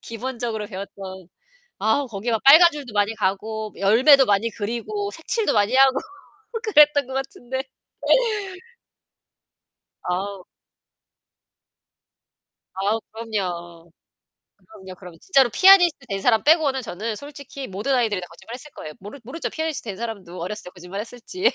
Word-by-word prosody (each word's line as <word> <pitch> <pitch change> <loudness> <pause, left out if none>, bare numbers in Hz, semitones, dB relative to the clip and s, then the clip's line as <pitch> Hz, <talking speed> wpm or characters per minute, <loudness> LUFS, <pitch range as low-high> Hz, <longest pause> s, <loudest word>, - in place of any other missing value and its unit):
기본적으로 230 -2 -4
배웠던 190 -2 -9 0.5
아, 220 +7 +1
거기 225 +2 -4
막 225 -2 0
빨간 320 +5 +9
줄도 275 -7 -8
많이 205 +2 +1
가고 215 +2 -2
뭐 - - -15
열매도 260 +7 +6
많이 205 +2 +2
그리고 240 - -4
색칠도 455 -3 -1
많이 210 +3 +2
하고 270 0 +5 0.7
그랬던 295 - +5
것 265 - -8
같은데. 265 -1 -4 2.4
아우. 190 +1 -3 2.3
아우, 200 +4 0
그럼요. 175 -7 -5 0.7
그럼요. 190 - -13
그러면 180 -3 -12
진짜로 270 -9 +3
피아니스트 355 - +6
된 195 -2 -3
사람 225 +1 +3
빼고는 295 -4 +3
저는 220 0 -5
솔직히 280 -1 -9
모든 210 +8 -2
아이들이 220 -6 +1
다 180 - -8
거짓말을 200 +7 -11
했을 300 +4 -9
거예요. 155 - -9
모르 205 +8 -10
모르죠? 265 +9 -5
피아니스트 315 -7 -4
된 195 - -7
사람도 200 -6 -7
어렸을 205 +5 -5
때 180 - -9
거짓말했을지. 225 - -3
225 Hz, 320 characters per minute, -23 LUFS, 195-270 Hz, 2.4 s, 빨간